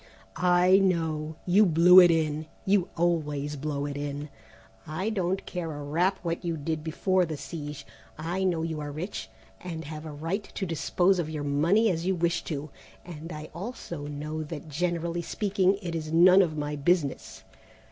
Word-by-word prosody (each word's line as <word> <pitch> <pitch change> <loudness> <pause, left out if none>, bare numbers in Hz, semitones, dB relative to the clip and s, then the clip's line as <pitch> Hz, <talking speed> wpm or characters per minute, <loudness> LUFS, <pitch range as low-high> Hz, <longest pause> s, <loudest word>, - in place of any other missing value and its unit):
"I 180 +1 +5
know; 160 -5 0
you 190 +4 +5
blew 180 0 +7
it 175 -1 +8
in; 155 -2 0 0.2
you 195 -2 +2
always 150 -4 0
blow 145 0 -3
it 145 -1 -4
in. 145 +1 -4 0.6
I 185 +8 -2
don't 190 -2 -1
care 175 -3 -4
a 145 0 -6
rap 175 +7 +1
what 170 +1 -2
you 170 -2 -2
did 155 +1 -3
before 185 +4 +1
the 160 -3 -3
siege: 150 -2 -7 0.3
I 170 +5 -2
know 170 -4 +1
you 160 -2 -3
are 145 -1 -5
rich 165 - -5 0.3
and 165 -3 -5
have 155 +1 -7
a - - -6
right 165 +8 -3
to 195 - -2
dispose 175 +3 +1
of 160 -3 -2
your 155 -2 -4
money 170 +10 +3
as 170 0 -2
you 190 - +2
wish 170 0 0
to, 150 -2 -5 0.3
and 165 -1 -8
I 155 -1 -8
also 170 -6 -6
know 150 +2 -4
that, 155 0 -7
generally 170 +2 -1
speaking, 195 +1 +1
it 170 -2 -4
is 155 -1 -4
none 180 +4 +7
of 160 -4 0
my 150 0 -2
business. 145 -1 -1
165 Hz, 180 wpm, -27 LUFS, 150-180 Hz, 0.6 s, it